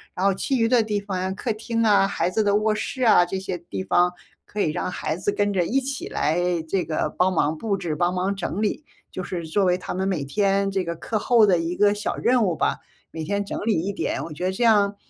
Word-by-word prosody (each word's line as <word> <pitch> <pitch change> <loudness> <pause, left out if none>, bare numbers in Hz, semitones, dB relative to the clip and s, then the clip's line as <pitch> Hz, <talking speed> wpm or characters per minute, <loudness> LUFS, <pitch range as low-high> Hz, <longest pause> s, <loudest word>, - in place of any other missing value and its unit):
然 185 - -1
后 200 - +4
其 265 +8 -1
余 230 -1 +2
的 240 0 +4
地 215 -2 -1
方 200 -2 -4
呀， 190 +1 -1
客 220 +4 -2
厅 230 +1 -2
啊、 205 -3 +4
孩 200 - -1
子 220 - +1
的 205 -1 +2
卧 215 +1 +2
室 255 +4 -3
啊， 220 -6 +6
这 185 +2 -4
些 185 -2 -4
地 100 - -6
方 175 - +3 0.4
可 210 - -7
以 155 - +1
让 155 - -2
孩 160 -3 -3
子 185 +4 -1
跟 205 0 0
着 185 -2 +2
一 245 +10 +1
起 275 +1 -4
来 155 +4 0 0.3
这 185 +2 0
个 155 -1 -2
帮 185 +1 +2
忙 160 -3 +1
布 200 +4 -2
置、 165 -5 -3
帮 175 +3 +1
忙 190 +2 0
整 195 +1 -3
理。 215 +8 -1 0.3
就 - - -5
是 175 -2 -5
作 180 +6 +1
为 180 -1 +3
他 185 - -6
们 190 +1 -1
每 170 -8 -1
天 195 +5 +1
这 190 -1 0
个 170 -1 -4
课 215 +6 -3
后 230 0 +4
的 185 -4 +3
一 165 +1 -2
个 205 +1 +4
小 210 0 -3
任 245 -1 +2
务 175 -4 0
吧， - - 0 0.3
每 160 -1 -5
天 200 +5 -2
整 - - -4
理 220 -7 +2
一 200 +2 -2
点。 - - -2
我 160 - -7
觉 150 - -7
得 185 - +1
这 190 +6 -2
样， 205 -3 +4
195 Hz, 280 characters per minute, -23 LUFS, 175-210 Hz, 0.4 s, 啊